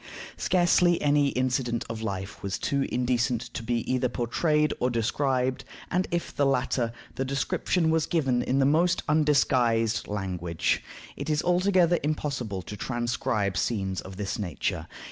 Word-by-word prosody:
Scarcely 175 -1 +3
any 145 -1 +3
incident 125 -2 0
of 115 -1 -5
life 100 -3 -4
was 100 -1 -2
too 140 -1 0
indecent 125 -1 0
to - - -4
be 115 +1 -1
either 130 -1 +1
portrayed 150 +6 +1
or 125 - +1
described, 130 +2 0 0.3
and 180 +1 +1
if 170 0 -3
the 145 - +2
latter, 125 -3 +1 0.3
the 135 - 0
description 150 +5 0
was 160 -1 +1
given 135 -7 +1
in 130 - 0
the 135 - +4
most 165 +5 +3
undisguised 125 -7 +2
language. 90 -5 -1 0.3
It 140 +2 -5
is 150 0 +1
altogether 180 -1 +3
impossible 135 -10 -2
to 105 - -7
transcribe 120 -4 -1
scenes 95 -1 -1
of 95 0 -10
this 100 0 -3
nature. 90 -8 -3
130 Hz, 145 wpm, -27 LUFS, 115-150 Hz, 0.3 s, the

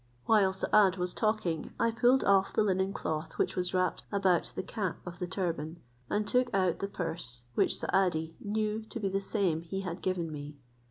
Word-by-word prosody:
While 205 -4 +4
Saad 190 0 +3
was 180 0 -2
talking, 215 -7 -1
I 230 - +3
pulled 245 +3 +4
off 195 -1 +3
the - - +3
linen 190 -1 +1
cloth 155 -5 -4
which - - 0
was 180 -1 -1
wrapped 185 -1 0
about 190 -4 +2
the - - -2
cap 190 -1 -3
of 175 -1 -8
the 180 - -2
turban, 170 -3 -3 0.3
and 210 0 0
took 250 0 +2
out 185 -3 +2
the 200 - -2
purse, 165 -10 -5
which - - +2
Saadi 165 -4 0
knew 215 +1 -1
to 235 - -5
be 200 -3 0
the 195 +1 -1
same 195 -6 0
he 185 +3 -4
had 180 -2 -5
given 175 -3 -1
me. 145 0 -7
190 Hz, 195 wpm, -31 LUFS, 170-205 Hz, 0.3 s, While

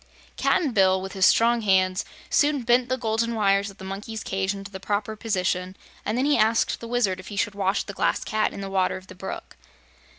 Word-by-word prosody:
Cap'n 300 -7 +1
Bill, 190 -3 +4
with 190 +1 -6
his 190 -2 +4
strong 235 +1 +4
hands, 185 -2 +2 0.3
soon 290 -3 +3
bent 240 +1 +3
the 255 - 0
golden 230 0 -1
wires 200 -1 +2
of 195 - -14
the - - -11
monkeys' 205 +3 -6
cage 190 0 -1
into 200 0 -7
the 190 - -7
proper 205 +2 -2
position 185 -3 -2 0.3
and 215 +3 -1
then 260 - +1
he 290 -3 +3
asked 220 +1 +2
the 230 - -8
Wizard 230 -6 0
if 185 - -11
he 205 - -7
should 205 +1 0
wash 195 0 0
the 200 - -8
Glass - - 0
Cat 215 0 0
in - - -7
the 195 0 -5
water 190 -1 +1
of 185 - -12
the - - -12
brook. 185 +1 -8
200 Hz, 225 wpm, -25 LUFS, 190-230 Hz, 0.3 s, Bill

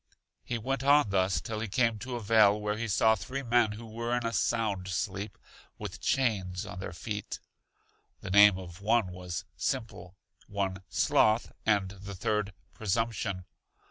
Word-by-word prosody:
He 120 - -2
went 135 +4 -2
on 140 -6 +5
thus 95 0 +2
till 110 -1 -4
he 115 - -3
came 115 +1 +1
to 125 +3 -5
a - - -3
vale 105 -1 +5
where 105 0 -1
he 115 +1 -3
saw 110 +2 +4
three 130 +7 -4
men 120 -3 +3
who 115 +2 -9
were 115 +2 -2
in 120 - -3
a 115 - -1
sound 105 -7 0
sleep, 100 +2 -3 0.4
with - - -7
chains 95 -9 0
on 90 - -8
their 95 - -5
feet. 105 +4 -5 0.8
The 95 - -6
name 100 -1 +7
of 90 0 -9
one 110 -2 +2
was 90 -2 -5
Simple, 110 -7 -3 0.3
one 95 -1 -2
Sloth, 110 +2 +3 0.2
and 100 -3 +3
the 100 0 -9
third 105 +2 -1 0.2
Presumption. 105 -3 -1
105 Hz, 165 wpm, -30 LUFS, 95-115 Hz, 0.8 s, name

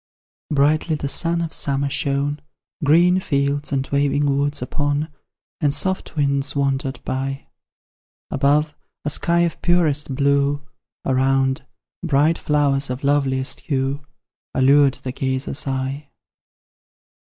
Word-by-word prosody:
Brightly 155 +2 +2
the 145 - -3
sun 170 +4 +1
of 165 -1 -3
summer 140 0 -1
shone 145 0 -1 0.4
Green 175 +5 +5
fields 140 -3 -1
and 135 -1 -1
waving 145 +1 +2
woods 145 +1 0
upon, 145 +3 -2 0.5
And 145 -4 +1
soft 190 -3 -2
winds 140 -1 +1
wandered 135 -1 -1
by; 135 +1 -3 0.9
Above, 150 +2 +2 0.3
a 150 - +1
sky 170 +2 +2
of 170 -2 -1
purest 155 -6 +1
blue, 140 +1 +2 0.4
Around, 135 +1 +1 0.3
bright 155 0 +2
flowers 145 -2 +1
of 125 +2 -4
loveliest 135 -2 0
hue, 135 0 -2 0.5
Allured 140 +1 +5
the 130 - -6
gazer's 130 +2 -3
eye. 135 +2 -3
140 Hz, 115 wpm, -21 LUFS, 135-150 Hz, 0.9 s, Green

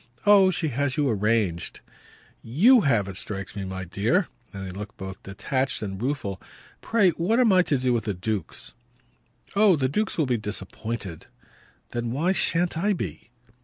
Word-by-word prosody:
Oh 200 -2 +7
she 170 -4 0
has 140 +2 -1
you 145 -2 +2
arranged!" 105 -6 0 0.6
"YOU 215 - +5
have, 115 -8 +3
it 95 -1 -6
strikes 100 +1 -5
me, 100 -2 -4
my 95 0 -5
dear" 115 - +1 0.2
and 95 -2 -6
he 95 - -6
looked 105 +3 -8
both 95 -1 -7
detached 130 +6 -2
and 95 -1 -5
rueful. 120 - -2 0.4
"Pray 205 -6 +3
what 185 +9 +1
am 240 -4 +5
I 185 - +6
to 150 -5 +1
do 125 -1 +1
with 115 -3 -1
the 105 -3 -2
dukes?" 105 +3 -4 0.8
"Oh 200 -3 +6
the 135 -3 +1
dukes 215 +11 -1
will 160 - +2
be 125 -2 +1
disappointed!" 100 -2 -5 0.6
"Then 120 0 -3
why 160 +9 +1
shan't 175 -3 +1
I 205 +4 +2
be?" 170 - -6
120 Hz, 170 wpm, -25 LUFS, -, 0.8 s, Oh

